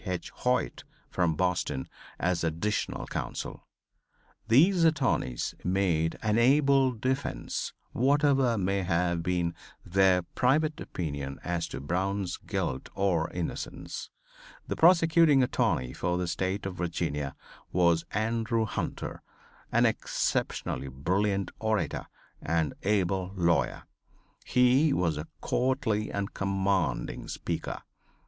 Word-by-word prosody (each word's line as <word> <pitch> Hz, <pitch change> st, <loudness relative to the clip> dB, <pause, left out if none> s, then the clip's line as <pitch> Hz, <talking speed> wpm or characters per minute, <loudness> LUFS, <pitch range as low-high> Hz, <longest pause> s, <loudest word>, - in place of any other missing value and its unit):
Hoyt 95 Hz, -, -1 dB, 0.3 s
from 85 Hz, -3 st, +1 dB
Boston, 90 Hz, -6 st, -1 dB, 0.3 s
as 90 Hz, -1 st, 0 dB
additional 85 Hz, +7 st, -1 dB
counsel. -, -, -5 dB, 0.8 s
These 165 Hz, -, +5 dB
attorneys 155 Hz, -, +1 dB
made 90 Hz, -4 st, +1 dB
an 105 Hz, +1 st, +2 dB
able 135 Hz, +1 st, +4 dB
defense, 130 Hz, -, -2 dB, 0.2 s
whatever 135 Hz, -2 st, +3 dB
may 100 Hz, 0 st, 0 dB
have 85 Hz, -1 st, +1 dB
been 85 Hz, -1 st, 0 dB, 0.3 s
their 95 Hz, -1 st, +4 dB
private 150 Hz, -, +1 dB
opinion 70 Hz, -5 st, -4 dB
as 85 Hz, -2 st, -1 dB
to -, -, -6 dB
Brown's 90 Hz, +5 st, -1 dB
guilt 65 Hz, 0 st, -3 dB
or 90 Hz, -5 st, +1 dB
innocence. 90 Hz, -2 st, -5 dB, 0.6 s
The -, -, -2 dB
prosecuting 165 Hz, -4 st, +5 dB
attorney 65 Hz, -, 0 dB
for 90 Hz, +4 st, -1 dB
the 90 Hz, 0 st, -1 dB
State 95 Hz, +3 st, -2 dB
of 95 Hz, -2 st, -4 dB
Virginia 75 Hz, -5 st, -2 dB, 0.4 s
was 85 Hz, -2 st, +3 dB
Andrew 115 Hz, +1 st, 0 dB
Hunter, 110 Hz, -, -4 dB, 0.5 s
an -, -, +4 dB
exceptionally 70 Hz, -, -1 dB
brilliant 95 Hz, +9 st, 0 dB
orator 110 Hz, -8 st, -1 dB, 0.3 s
and 80 Hz, -3 st, 0 dB
able 95 Hz, -2 st, 0 dB
lawyer. 85 Hz, -3 st, +1 dB, 0.6 s
He 130 Hz, +4 st, +4 dB
was 85 Hz, -, +1 dB
a 75 Hz, -, -6 dB
courtly 125 Hz, -5 st, 0 dB
and 100 Hz, 0 st, -3 dB
commanding 95 Hz, -2 st, -1 dB
speaker. -, -, -4 dB
95 Hz, 105 wpm, -29 LUFS, 85-120 Hz, 0.8 s, These